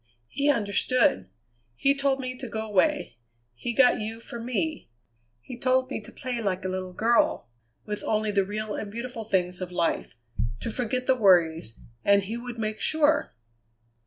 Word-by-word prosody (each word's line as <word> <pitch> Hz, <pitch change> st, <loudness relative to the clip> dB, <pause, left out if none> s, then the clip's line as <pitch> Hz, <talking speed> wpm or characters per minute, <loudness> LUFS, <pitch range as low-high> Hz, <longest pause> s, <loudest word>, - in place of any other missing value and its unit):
He 280 Hz, +1 st, 0 dB
understood. 210 Hz, -, +2 dB, 0.5 s
He 275 Hz, -, +3 dB
told 275 Hz, -1 st, +1 dB
me 255 Hz, -1 st, -4 dB
to 255 Hz, -1 st, -7 dB
go 220 Hz, 0 st, -3 dB
away; 255 Hz, -, +1 dB, 0.4 s
he 180 Hz, -, -4 dB
got 250 Hz, +1 st, +5 dB
you 220 Hz, +1 st, -4 dB
for 235 Hz, 0 st, -8 dB
me. 255 Hz, -, -2 dB, 0.5 s
He 240 Hz, -, -9 dB
told 255 Hz, 0 st, +2 dB
me -, -, -3 dB
to -, -, -11 dB
play 250 Hz, -4 st, -4 dB
like 190 Hz, -3 st, -2 dB
a -, -, 0 dB
little 185 Hz, 0 st, -4 dB
girl, 225 Hz, -, +2 dB, 0.4 s
with 210 Hz, -1 st, -4 dB
only 215 Hz, 0 st, 0 dB
the 200 Hz, -1 st, +3 dB
real 210 Hz, +2 st, -4 dB
and 205 Hz, -, -5 dB
beautiful 235 Hz, +1 st, -5 dB
things 180 Hz, -3 st, -1 dB
of 180 Hz, -1 st, -4 dB
life; 170 Hz, -2 st, -1 dB, 0.5 s
to 230 Hz, -, -3 dB
forget 250 Hz, +2 st, -2 dB
the 260 Hz, -, +4 dB
worries, 170 Hz, -, +3 dB, 0.2 s
and 200 Hz, 0 st, +4 dB
he 215 Hz, +4 st, -4 dB
would 240 Hz, 0 st, -6 dB
make 215 Hz, -1 st, -3 dB
sure! 310 Hz, -1 st, +2 dB
225 Hz, 170 wpm, -27 LUFS, 195-255 Hz, 0.5 s, got